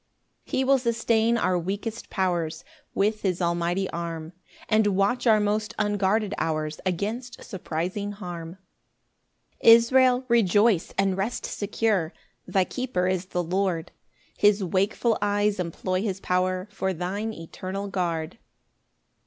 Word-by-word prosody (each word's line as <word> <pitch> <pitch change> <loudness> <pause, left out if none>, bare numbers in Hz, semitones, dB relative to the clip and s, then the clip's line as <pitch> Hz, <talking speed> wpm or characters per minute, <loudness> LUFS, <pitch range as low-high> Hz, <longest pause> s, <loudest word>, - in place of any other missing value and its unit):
3 - - -2
He 265 - +3
will 270 0 +4
sustain 235 -1 +2
our 185 -5 +1
weakest 205 +6 -4
powers 175 -4 -1 0.3
With 215 +2 +1
his 185 -3 0
almighty 175 +2 0
arm, 165 -1 -5 0.3
And 215 -1 +3
watch 240 +6 +1
our 220 -2 +6
most 210 +1 -1
unguarded 205 0 +1
hours 155 -1 -2
Against 220 +7 -3
surprising 185 +3 -4
harm. 175 -3 -7 1.0
4 - - +6
Israel, 250 +2 +6
rejoice 210 -4 +3
and 195 -1 +2
rest 205 +6 -2
secure, 205 -5 -1 0.3
Thy 190 - +2
keeper 245 -3 -2
is 185 0 -1
the 180 -1 -2
Lord; 180 -1 -1 0.4
His 205 -1 +3
wakeful 200 +5 +1
eyes 205 0 +1
employ 185 +2 -2
his 195 -3 -2
power 185 +1 0
For 190 -1 -2
thine 195 +6 -3
eternal 190 +2 -6
guard. 175 -1 -2
195 Hz, 130 wpm, -26 LUFS, 180-215 Hz, 1.0 s, our